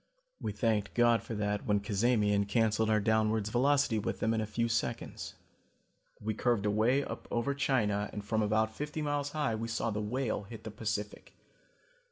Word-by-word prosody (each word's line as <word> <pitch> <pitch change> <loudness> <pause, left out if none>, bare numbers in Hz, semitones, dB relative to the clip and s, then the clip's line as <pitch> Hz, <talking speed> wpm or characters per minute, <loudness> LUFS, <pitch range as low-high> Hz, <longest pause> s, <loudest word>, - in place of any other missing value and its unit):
We - - -2
thanked 110 -4 0
God 120 -1 +4
for 115 - -6
that 105 0 -2
when 105 -1 +3
Cazamian 105 0 +2
canceled 110 +1 +2
our 110 -1 +4
downwards 110 0 +1
velocity 135 -2 +3
with - - -3
them 110 - +1
in 110 - 0
a 110 - -2
few 115 +2 0
seconds. 115 - -3 0.8
We 110 +1 -2
curved 115 -1 +1
away 110 +7 +3
up - - -7
over 120 +4 0
China 115 -7 +1
and 105 -1 -6
from 110 +1 0
about 110 +1 +1
fifty 150 +5 -4
miles 145 -1 -1
high 150 -6 0
we 110 +1 -3
saw 115 0 -1
the 105 0 -2
Whale 115 +1 -1
hit 110 +2 -10
the 110 - -6
Pacific. 105 -1 -4
110 Hz, 180 wpm, -31 LUFS, 105-120 Hz, 0.8 s, God